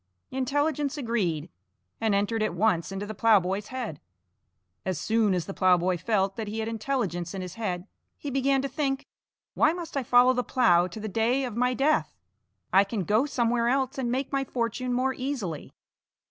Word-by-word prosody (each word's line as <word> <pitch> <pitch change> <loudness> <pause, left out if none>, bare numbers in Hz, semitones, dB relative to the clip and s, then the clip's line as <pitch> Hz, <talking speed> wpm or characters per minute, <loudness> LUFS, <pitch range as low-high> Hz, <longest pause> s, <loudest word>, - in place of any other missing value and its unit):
Intelligence 290 +3 0
agreed, 215 - -1 0.5
and 220 -3 +1
entered 205 +3 0
at 215 -5 0
once 175 -5 +1
into 195 +1 -4
the 215 - -6
ploughboy's 205 -2 +2
head. 245 - -5 0.8
As 185 -4 -2
soon 220 -2 +2
as 175 -3 -2
the 195 - -6
ploughboy 185 -1 +3
felt 195 -2 0
that 220 -2 -3
he 210 +2 -4
had 220 0 -2
intelligence 215 -7 -2
in 190 - -4
his 180 - -7
head, 185 -6 -3 0.3
he 285 - -5
began 270 0 +2
to - - 0
think: 275 0 -2 0.5
"Why 305 +2 +3
must 340 -3 -7
I 275 - +1
follow 250 +1 +5
the 250 0 0
plough 180 -10 +3
to 185 +4 -8
the 215 - -4
day 230 +6 +1
of 245 -4 -4
my 250 +1 +1
death? 295 +4 +1 0.6
I 195 +1 +7
can 200 0 -3
go 215 - +2
somewhere 235 -3 +1
else 270 +1 0
and 240 -2 -1
make 265 +2 -2
my 275 -1 +1
fortune 245 0 -2
more 255 +2 +1
easily." 250 - -4
230 Hz, 185 wpm, -27 LUFS, 195-265 Hz, 0.8 s, I